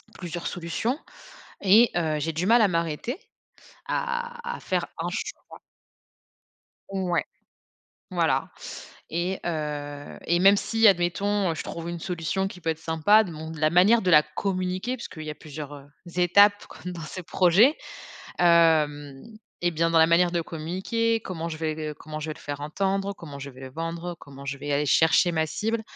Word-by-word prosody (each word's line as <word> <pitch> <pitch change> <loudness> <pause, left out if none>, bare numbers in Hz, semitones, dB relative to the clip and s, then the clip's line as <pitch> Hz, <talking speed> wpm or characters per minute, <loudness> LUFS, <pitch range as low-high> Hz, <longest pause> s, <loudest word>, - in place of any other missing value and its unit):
plusieurs 175 -1 -5
solutions 180 - -2 0.6
et, 210 +4 +6
heu, 160 -3 0
j'ai 160 +3 -1
du 170 +4 -1
mal 230 +2 +5
à 210 - +6
m'arrêter, 170 - -2 0.7
à 480 0 -3
à - - -13
faire - - -1
un - - -2
choix. - - -6 1.3
Ouais, 185 -3 -1 0.9
voilà. - - +1 0.6
Et, 175 +3 -2
heu, 145 -3 -4
et 175 +1 +2
même 195 +2 +6
si, 225 +2 +1
admettons, 195 +1 +2
heu, - - -4
je - - -5
trouve 170 0 -6
une 170 -1 -5
solution, 180 +2 -2
qui 185 - -10
peut 165 - -2
être 160 - -1
sympa, 165 +7 +4
de 180 - -7
mon 160 +1 -7
de 160 - -8
la 155 0 +3
manière 195 +7 +5
de 185 - +1
la 150 -2 +8
communiquer. 185 +8 -2
Puisqu'il 155 -8 -8
y 150 - -3
plusieurs, 150 -1 -8
heu, 140 -1 -11 0.3
étapes, 200 +3 +5
comme 180 - -8
dans 170 -2 -7
ce 185 +4 -7
projet, 190 - +4 0.6
hem, 155 -5 +3 0.4
et 175 0 +2
bien, 165 +1 +1
dans 165 - +3
la 160 - +6
manière 170 +1 +4
de 170 -1 0
communiquer. 190 +9 -1
Comment 170 -2 -5
je 155 - -5
vais 155 -1 -2
q 160 - -6
heu, 155 -1 -3
comment 155 0 -7
je 155 - -4
vais - - -3
le - - -15
faire 145 0 -6
entendre? 195 +6 -1
Comment 145 -6 -10
je 140 0 -7
vais 130 0 -14
le 130 - -7
vendre? 165 +3 -4
Comment 140 -1 -12
je 140 0 -3
vais 145 +1 -5
aller 145 +1 +1
chercher 160 +4 +4
ma 160 -1 +1
cible? 220 +7 -2
170 Hz, 185 wpm, -26 LUFS, 155-195 Hz, 1.3 s, la